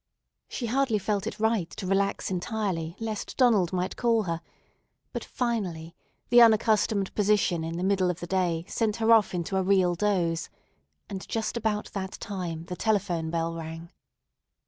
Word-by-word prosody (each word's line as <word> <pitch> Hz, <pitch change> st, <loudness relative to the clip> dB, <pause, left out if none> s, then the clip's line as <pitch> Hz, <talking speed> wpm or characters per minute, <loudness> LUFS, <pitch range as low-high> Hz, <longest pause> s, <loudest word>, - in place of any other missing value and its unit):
She 245 Hz, -, -4 dB
hardly 250 Hz, -1 st, +1 dB
felt 205 Hz, 0 st, -1 dB
it -, -, -5 dB
right 220 Hz, -6 st, +1 dB
to 200 Hz, -, -7 dB
relax 195 Hz, +1 st, 0 dB
entirely, 180 Hz, -4 st, -2 dB
lest 220 Hz, -2 st, -4 dB
Donald 220 Hz, -9 st, +4 dB
might 185 Hz, 0 st, -2 dB
call 230 Hz, -2 st, +2 dB
her; 165 Hz, -3 st, -3 dB, 0.7 s
but -, -, -3 dB
finally 185 Hz, -10 st, -3 dB, 0.4 s
the 240 Hz, 0 st, +7 dB
unaccustomed 215 Hz, -3 st, +3 dB
position 200 Hz, -5 st, +2 dB
in 165 Hz, +1 st, -4 dB
the 175 Hz, -, -2 dB
middle 190 Hz, -1 st, +2 dB
of 180 Hz, -1 st, -3 dB
the -, -, -5 dB
day 175 Hz, -2 st, 0 dB
sent 220 Hz, -2 st, 0 dB
her 225 Hz, 0 st, +2 dB
off 215 Hz, -5 st, +5 dB
into 175 Hz, +2 st, -2 dB
a -, -, +2 dB
real 185 Hz, -2 st, +3 dB
doze, 175 Hz, -3 st, 0 dB, 0.6 s
and 190 Hz, -1 st, -6 dB
just 225 Hz, +1 st, -2 dB
about 215 Hz, -2 st, -1 dB
that 190 Hz, -1 st, -4 dB
time 180 Hz, -6 st, -5 dB
the 180 Hz, -, -5 dB
telephone 185 Hz, -6 st, 0 dB
bell 165 Hz, 0 st, -1 dB
rang. 165 Hz, +1 st, -7 dB
195 Hz, 165 wpm, -27 LUFS, 170-220 Hz, 0.7 s, the